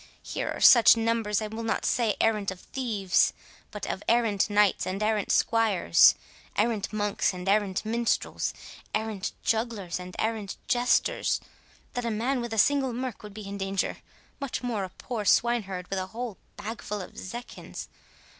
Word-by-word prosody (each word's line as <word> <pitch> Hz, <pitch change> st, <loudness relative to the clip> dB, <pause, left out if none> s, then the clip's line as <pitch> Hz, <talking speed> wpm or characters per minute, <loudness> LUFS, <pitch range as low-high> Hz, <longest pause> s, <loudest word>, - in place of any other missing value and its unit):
Here -, -, -3 dB
are -, -, -4 dB
such 235 Hz, -1 st, +8 dB
numbers, 225 Hz, -2 st, 0 dB
I -, -, -2 dB
will 220 Hz, +2 st, -6 dB
not 225 Hz, -, -1 dB
say 230 Hz, -4 st, +2 dB
of -, -, -11 dB
arrant 215 Hz, -3 st, +2 dB, 0.2 s
thieves, 215 Hz, -8 st, +2 dB, 0.4 s
but 210 Hz, -2 st, -6 dB
of 190 Hz, -, -3 dB
errant 225 Hz, -3 st, +2 dB
knights 205 Hz, -1 st, +3 dB
and 195 Hz, +3 st, -2 dB
errant 215 Hz, -2 st, +1 dB
squires, 220 Hz, -, +5 dB, 0.4 s
errant 225 Hz, -3 st, 0 dB
monks 205 Hz, -2 st, 0 dB
and 180 Hz, +1 st, -7 dB
errant 200 Hz, 0 st, +1 dB
minstrels, 230 Hz, +1 st, 0 dB, 0.4 s
errant 215 Hz, -3 st, -2 dB
jugglers 220 Hz, -6 st, -1 dB
and 180 Hz, 0 st, -9 dB
errant 220 Hz, -3 st, -2 dB
jesters, 245 Hz, 0 st, +2 dB, 0.5 s
that 245 Hz, -, -2 dB
a 235 Hz, -, -1 dB
man 240 Hz, +4 st, 0 dB
with 235 Hz, -1 st, -5 dB
a 225 Hz, -, -3 dB
single 270 Hz, +3 st, +3 dB
merk 250 Hz, -1 st, -4 dB
would 210 Hz, -1 st, -10 dB
be 210 Hz, -2 st, -7 dB
in 200 Hz, 0 st, -6 dB
danger, 195 Hz, -1 st, -1 dB, 0.4 s
much 275 Hz, -3 st, -4 dB
more 230 Hz, -5 st, -1 dB
a -, -, -9 dB
poor 225 Hz, +3 st, -5 dB
swineherd 200 Hz, -4 st, +1 dB
with 195 Hz, -, 0 dB
a 185 Hz, -, -3 dB
whole 230 Hz, 0 st, -6 dB, 0.2 s
bagful 210 Hz, -1 st, -5 dB
of 185 Hz, -, -9 dB
zecchins. 240 Hz, +5 st, -8 dB
215 Hz, 165 wpm, -27 LUFS, 200-235 Hz, 0.5 s, such